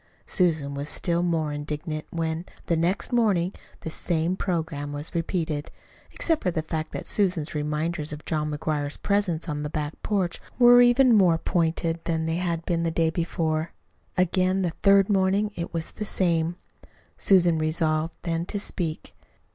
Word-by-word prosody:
Susan 155 Hz, -6 st, +1 dB
was 140 Hz, +2 st, -4 dB
still 170 Hz, -1 st, 0 dB
more 165 Hz, -4 st, 0 dB
indignant 150 Hz, +1 st, -4 dB
when, 165 Hz, 0 st, -2 dB, 0.2 s
the 170 Hz, -, +1 dB
next 175 Hz, +8 st, 0 dB
morning, 200 Hz, -6 st, +2 dB, 0.3 s
the -, -, -5 dB
same 170 Hz, +2 st, +1 dB
programme 160 Hz, -6 st, -2 dB
was 145 Hz, +2 st, -5 dB
repeated 165 Hz, -3 st, -2 dB, 0.4 s
except 325 Hz, -2 st, 0 dB
for 185 Hz, -, +1 dB
the 165 Hz, -3 st, -2 dB
fact 155 Hz, 0 st, -4 dB
that -, -, -5 dB
Susan's 180 Hz, -7 st, +1 dB
reminders 150 Hz, +1 st, -2 dB
of 150 Hz, 0 st, -8 dB
John 150 Hz, -2 st, -1 dB
McGuire's 150 Hz, -1 st, -2 dB
presence 195 Hz, -5 st, 0 dB
on 150 Hz, -2 st, -3 dB
the 150 Hz, -, -3 dB
back 150 Hz, 0 st, -3 dB
porch 190 Hz, -5 st, -1 dB, 0.2 s
were 245 Hz, 0 st, +8 dB
even 245 Hz, +1 st, +6 dB
more 185 Hz, -6 st, +5 dB
pointed 165 Hz, -1 st, 0 dB
than 160 Hz, -1 st, 0 dB
they 160 Hz, +1 st, -1 dB
had 170 Hz, -2 st, -2 dB
been 170 Hz, -1 st, 0 dB
on -, -, -1 dB
the -, -, +2 dB
day 165 Hz, 0 st, +1 dB
before. 160 Hz, -1 st, -1 dB, 0.4 s
Again 185 Hz, +1 st, +2 dB
the 175 Hz, -, 0 dB
third 195 Hz, -1 st, +5 dB
morning 200 Hz, +1 st, +2 dB
it 170 Hz, -, -4 dB
was 165 Hz, -1 st, -4 dB
the -, -, -5 dB
same. 170 Hz, -4 st, +1 dB, 0.6 s
Susan 175 Hz, -4 st, +4 dB
resolved 155 Hz, 0 st, 0 dB
then 170 Hz, 0 st, -2 dB
to 205 Hz, -, -3 dB
speak. 170 Hz, -5 st, -4 dB
165 Hz, 165 wpm, -25 LUFS, 155-185 Hz, 0.6 s, were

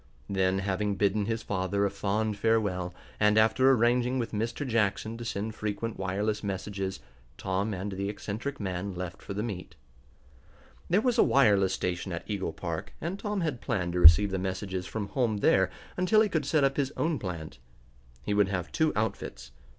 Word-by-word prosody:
Then, 95 Hz, -1 st, +1 dB
having 100 Hz, +1 st, -1 dB
bidden 100 Hz, +1 st, +1 dB
his 115 Hz, 0 st, -2 dB
father 95 Hz, +1 st, 0 dB
a 100 Hz, -, 0 dB
fond 105 Hz, +2 st, -1 dB
farewell, 100 Hz, -5 st, +1 dB, 0.3 s
and 105 Hz, 0 st, +4 dB
after 110 Hz, +5 st, +5 dB
arranging 125 Hz, 0 st, +3 dB
with 120 Hz, -3 st, -2 dB
Mr. 115 Hz, +6 st, -2 dB
Jackson 110 Hz, -1 st, 0 dB
to -, -, -5 dB
send 110 Hz, -1 st, -3 dB
frequent 110 Hz, +1 st, -4 dB
wireless 100 Hz, +3 st, -1 dB
messages, 95 Hz, -4 st, -4 dB, 0.4 s
Tom 95 Hz, +3 st, -1 dB
and 100 Hz, +1 st, -4 dB
the 100 Hz, +1 st, -3 dB
eccentric 110 Hz, +7 st, -5 dB
man 95 Hz, -1 st, -3 dB
left 90 Hz, +1 st, -6 dB
for 100 Hz, -, -7 dB
the 105 Hz, -, -1 dB
meet. 90 Hz, -7 st, -6 dB, 1.1 s
There 190 Hz, +5 st, +4 dB
was 245 Hz, 0 st, +1 dB
a -, -, +8 dB
wireless 100 Hz, -8 st, +4 dB
station 90 Hz, +1 st, -3 dB
at 85 Hz, -, -5 dB
Eagle 100 Hz, -5 st, -2 dB
Park, 85 Hz, +3 st, -5 dB
and 175 Hz, +5 st, -4 dB
Tom 205 Hz, -2 st, -2 dB
had 150 Hz, -8 st, -2 dB
planned 85 Hz, -3 st, -1 dB
to 90 Hz, -, 0 dB
receive 90 Hz, +4 st, +8 dB
the 95 Hz, -, -1 dB
messages 95 Hz, 0 st, -3 dB
from 105 Hz, -3 st, -4 dB
home 115 Hz, -2 st, 0 dB
there -, -, +3 dB, 0.3 s
until 185 Hz, +4 st, +4 dB
he 215 Hz, -, +2 dB
could 155 Hz, -6 st, -1 dB
set 155 Hz, -3 st, +3 dB
up 135 Hz, 0 st, +2 dB
his 140 Hz, -1 st, 0 dB
own 160 Hz, -4 st, 0 dB
plant. 80 Hz, -, -6 dB, 0.6 s
He 105 Hz, -, -1 dB
would 100 Hz, -1 st, +4 dB
have 90 Hz, -3 st, -3 dB
two 160 Hz, -2 st, +2 dB
outfits. 60 Hz, -, -3 dB
105 Hz, 180 wpm, -29 LUFS, 95-115 Hz, 1.1 s, a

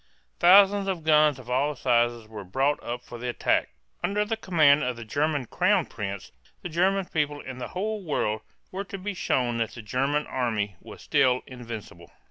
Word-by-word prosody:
Thousands 195 Hz, +2 st, +6 dB
of 185 Hz, -4 st, -2 dB
guns 150 Hz, -2 st, +4 dB
of 130 Hz, -2 st, -13 dB
all 140 Hz, +4 st, 0 dB
sizes 120 Hz, -3 st, +1 dB
were 110 Hz, -2 st, -8 dB
brought 135 Hz, +10 st, 0 dB
up 120 Hz, +1 st, -5 dB
for 120 Hz, -1 st, -10 dB
the 125 Hz, +1 st, -3 dB
attack. 120 Hz, -, +1 dB, 0.3 s
Under 210 Hz, +1 st, +1 dB
the 225 Hz, +2 st, -1 dB
command 155 Hz, -9 st, +4 dB
of 125 Hz, 0 st, -1 dB
the 115 Hz, -1 st, -9 dB
German 145 Hz, +3 st, 0 dB
crown -, -, +2 dB
prince, 100 Hz, -2 st, -6 dB, 0.3 s
the 180 Hz, -, -4 dB
German 185 Hz, +4 st, +1 dB
people 150 Hz, -3 st, -1 dB
and 130 Hz, -1 st, -7 dB
the -, -, -3 dB
whole 215 Hz, +2 st, -2 dB
world 110 Hz, -9 st, -1 dB, 0.3 s
were 195 Hz, +2 st, -4 dB
to 195 Hz, -, -7 dB
be 200 Hz, +2 st, -4 dB
shown 125 Hz, -9 st, 0 dB
that 115 Hz, -, -2 dB
the 120 Hz, -, -9 dB
German 135 Hz, +7 st, 0 dB
army 110 Hz, -6 st, -2 dB
was -, -, -12 dB
still 125 Hz, -1 st, +2 dB
invincible. 115 Hz, -, -9 dB
135 Hz, 185 wpm, -26 LUFS, 120-170 Hz, 0.3 s, Thousands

